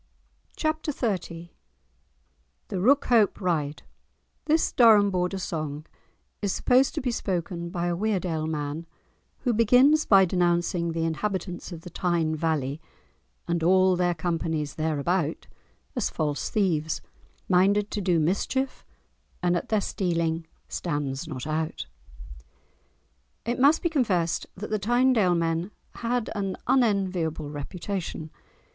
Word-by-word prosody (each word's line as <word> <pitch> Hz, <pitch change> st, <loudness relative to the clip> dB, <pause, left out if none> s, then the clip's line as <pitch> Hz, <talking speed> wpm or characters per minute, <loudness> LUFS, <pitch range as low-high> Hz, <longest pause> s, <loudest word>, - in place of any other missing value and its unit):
*Chapter 310 Hz, -1 st, -1 dB
XXX* 180 Hz, -, -3 dB, 1.2 s
*The 195 Hz, -, -3 dB
Rookhope 235 Hz, 0 st, +3 dB
Ride* 155 Hz, -6 st, -1 dB, 0.6 s
This 315 Hz, +1 st, +2 dB
Durham 215 Hz, -4 st, +6 dB
border 180 Hz, +1 st, -1 dB
song 155 Hz, -4 st, -4 dB, 0.6 s
is 200 Hz, -2 st, 0 dB
supposed 255 Hz, +6 st, +3 dB
to -, -, -1 dB
be 250 Hz, -1 st, -1 dB
spoken 175 Hz, -5 st, -3 dB
by 175 Hz, -1 st, -2 dB
a 175 Hz, -1 st, 0 dB
Weardale 180 Hz, -5 st, -1 dB
man, 155 Hz, +1 st, -4 dB, 0.5 s
who 245 Hz, -, +1 dB
begins 250 Hz, +7 st, +5 dB
by 195 Hz, -2 st, +7 dB
denouncing 175 Hz, -1 st, +1 dB
the 165 Hz, 0 st, -1 dB
inhabitants 180 Hz, +2 st, -3 dB
of 165 Hz, -2 st, -7 dB
the 180 Hz, -, -10 dB
Tyne 170 Hz, -3 st, 0 dB
valley, 155 Hz, -2 st, -1 dB, 0.7 s
"and 170 Hz, -1 st, 0 dB
all 185 Hz, +2 st, +4 dB
their 175 Hz, -1 st, +1 dB
companies 160 Hz, -3 st, -2 dB
there 155 Hz, -1 st, -1 dB
about" 165 Hz, +1 st, -1 dB, 0.5 s
as 245 Hz, -, 0 dB
false 150 Hz, -3 st, -2 dB
thieves, 160 Hz, -7 st, 0 dB, 0.5 s
"minded 200 Hz, +3 st, +3 dB
to 205 Hz, -, -2 dB
do 180 Hz, -3 st, +2 dB
mischief 230 Hz, -, -1 dB, 0.6 s
And 175 Hz, 0 st, +3 dB
at 175 Hz, -, -3 dB
their 215 Hz, -2 st, +2 dB
stealing 165 Hz, -4 st, -1 dB, 0.2 s
stands 145 Hz, -2 st, -3 dB
not 130 Hz, -5 st, -6 dB
out." 155 Hz, +1 st, -2 dB, 1.6 s
It 240 Hz, +2 st, -1 dB
must 285 Hz, +5 st, +5 dB
be 340 Hz, -, +2 dB
confessed 190 Hz, -, 0 dB
that 205 Hz, +3 st, -7 dB
the 215 Hz, -, +1 dB
Tynedale 235 Hz, -3 st, +3 dB
men 165 Hz, +2 st, -1 dB, 0.2 s
had 240 Hz, -1 st, -2 dB
an 195 Hz, -3 st, -3 dB
unenviable 190 Hz, -, +1 dB
reputation. 165 Hz, +1 st, -5 dB
180 Hz, 125 wpm, -26 LUFS, 160-210 Hz, 1.6 s, by